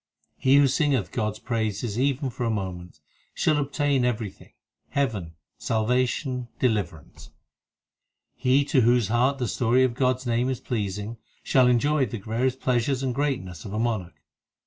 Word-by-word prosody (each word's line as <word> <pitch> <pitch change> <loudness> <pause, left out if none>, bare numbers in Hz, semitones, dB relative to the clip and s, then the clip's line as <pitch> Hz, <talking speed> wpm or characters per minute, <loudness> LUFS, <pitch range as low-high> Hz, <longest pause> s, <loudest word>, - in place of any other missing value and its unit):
8 - - -23
He 130 +1 +5
who 140 -1 +6
singeth 135 - +1
God 110 -3 -1
s 105 - -13
praises 110 -1 -2
even 135 0 0
for 120 - -5
a 115 - +1
moment, 90 -6 -5 0.3
Shall 155 - +2
obtain 140 -2 +1
everything 110 -5 -3 0.4
heaven, 105 - -2 0.2
salvation, 125 +3 0
deliverance. 100 - -2 1.1
He 130 +3 +2
to 140 -3 +3
whose 120 -2 +3
heart 125 +4 +2
the 125 -3 -2
story 125 +2 +2
of 130 -2 +1
God 130 +1 +2
s 130 +1 -12
name 120 +2 +1
is 130 -2 -2
pleasing, 105 -1 -3 0.3
Shall 130 -2 +4
enjoy 135 +3 +2
the 115 - -5
various 115 +5 -1
pleasures 130 +1 0
and 130 -2 0
greatness 120 - -2
of 100 - -7
a 105 - -2
monarch. 100 -9 -2
120 Hz, 160 wpm, -25 LUFS, 110-130 Hz, 1.1 s, who